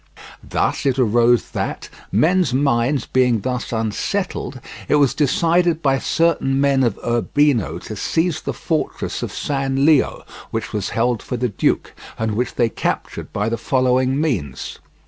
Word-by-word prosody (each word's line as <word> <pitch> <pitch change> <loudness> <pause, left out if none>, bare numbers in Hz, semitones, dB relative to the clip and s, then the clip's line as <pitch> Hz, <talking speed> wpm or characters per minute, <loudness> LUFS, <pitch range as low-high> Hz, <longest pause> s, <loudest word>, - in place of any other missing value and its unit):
Thus - - -1
it 135 -1 +1
arose 120 0 +3
that, - - -3 0.2
men's 170 -5 +2
minds 135 -1 +1
being 125 -4 +2
thus 125 +1 -3
unsettled, 120 - -2 0.3
it - - +3
was 140 -3 +4
decided 165 +4 +2
by 135 -2 +2
certain 155 -5 +1
men 140 -1 +3
of 120 -5 +1
Urbino 120 - +1
to 110 - -7
seize 160 - 0
the - - -3
fortress - - -3
of - - -4
San 135 -1 -1
Leo, 155 -3 +3 0.3
which - - -4
was 105 -2 -2
held 120 -1 +1
for 125 - -4
the 125 +1 0
duke, 105 - 0 0.2
and 110 0 -1
which 125 +4 -2
they 120 - +3
captured - - -3
by 105 +2 -1
the 115 +1 -1
following 130 +1 +1
means. 95 - -2
130 Hz, 150 wpm, -20 LUFS, 115-145 Hz, 0.3 s, was